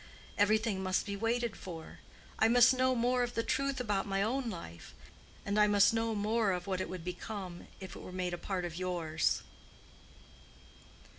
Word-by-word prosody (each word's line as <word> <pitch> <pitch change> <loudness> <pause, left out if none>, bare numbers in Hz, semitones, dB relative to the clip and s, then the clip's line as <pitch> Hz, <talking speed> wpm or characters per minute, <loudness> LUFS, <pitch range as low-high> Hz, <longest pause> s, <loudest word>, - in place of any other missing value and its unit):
Everything 215 -1 +2
must 185 0 0
be 200 -2 -3
waited 230 +2 0
for. 165 -4 -9 0.4
I 220 - +5
must 245 +2 +7
know 255 0 +2
more 245 +1 +2
of 245 0 -2
the 230 - +1
truth 275 +1 0
about 205 -6 -1
my 195 0 +1
own 250 +3 -1
life, 85 - -9 0.5
and 200 +1 +1
I 210 - +6
must 205 +1 +5
know 225 0 0
more 210 0 +1
of 180 0 -3
what 185 -1 -1
it - - -4
would 180 -2 -6
become 180 0 -6
if 190 -2 -8
it - - -8
were - - -9
made 180 -1 -2
a - - -2
part 185 -3 -2
of 170 -2 -5
yours." 175 -4 0
205 Hz, 180 wpm, -33 LUFS, 185-230 Hz, 0.5 s, must